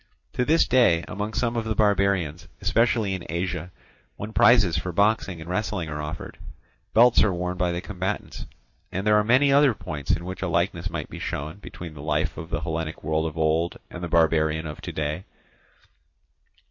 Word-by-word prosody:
To 125 - +1
this 160 +5 +3
day 115 -10 +4
among 105 +2 -4
some 120 -1 0
of 115 - 0
the 110 -1 -2
barbarians, 100 -7 +1
especially 115 -4 +2
in 95 -2 -4
Asia, 90 0 -3 0.5
when 105 +2 -7
prizes 105 -10 +5
for 85 +3 -2
boxing 100 -1 +1
and 80 - -9
wrestling 90 -2 -2
are 75 0 -4
offered, 75 +2 -7 0.6
belts 120 +2 +6
are 105 - +2
worn 90 0 -2
by 90 -1 0
the 85 0 -3
combatants. 95 +1 -4 0.4
And 95 +3 -3
there 105 0 +5
are 105 - +3
many 130 +5 +4
other 140 -4 +5
points 75 -6 -7
in 85 +1 +1
which 90 0 -6
a - - -1
likeness - - 0
might - - -5
be - - -7
shown 75 +5 -4
between 85 -5 -9
the 75 - -10
life 75 - -1
of 80 +1 -8
the - - -2
Hellenic 80 -1 -4
world 80 +1 0
of 80 0 -7
old 80 +2 +1
and 90 - -7
the - - -2
barbarian 80 -1 +2
of 75 -1 -7
to - - -5
day. 75 +3 -3
90 Hz, 190 wpm, -25 LUFS, 80-105 Hz, 0.6 s, belts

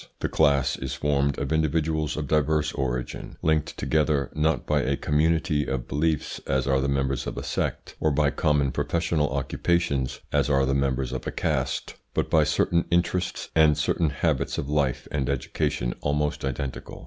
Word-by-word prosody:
The - - -1
CLASS 70 -2 +3
is 65 - -4
formed 70 -2 +1
of 70 +2 -2
individuals 80 0 0
of 75 -2 -3
diverse 75 +1 +1
origin, 65 -3 -3
linked 80 -1 +1
together 75 -3 +1
not 75 -3 +1
by 75 -1 +2
a 70 +1 0
community 80 0 +1
of 65 -2 -3
beliefs, 75 +1 -1
as 65 -1 +1
are 65 0 +2
the 70 - 0
members 70 -1 -1
of - - -5
a - - -4
sect, - - -3
or 80 - +2
by 70 0 +2
common 75 -3 +1
professional 80 0 0
occupations, 70 0 0
as - - +2
are 70 -1 +3
the 70 - +1
members 65 -2 0
of - - -4
a - - -1
caste, - - -1 0.2
but - - 0
by 80 -1 +5
certain 85 +3 +1
interests 90 +1 0
and 80 -2 +5
certain 80 -3 +1
habits 70 - -1
of - - -3
life 65 -3 0
and 70 -2 -1
education - - -1
almost 75 +1 -1
identical. 65 0 -4
75 Hz, 170 wpm, -26 LUFS, 70-80 Hz, 0.2 s, by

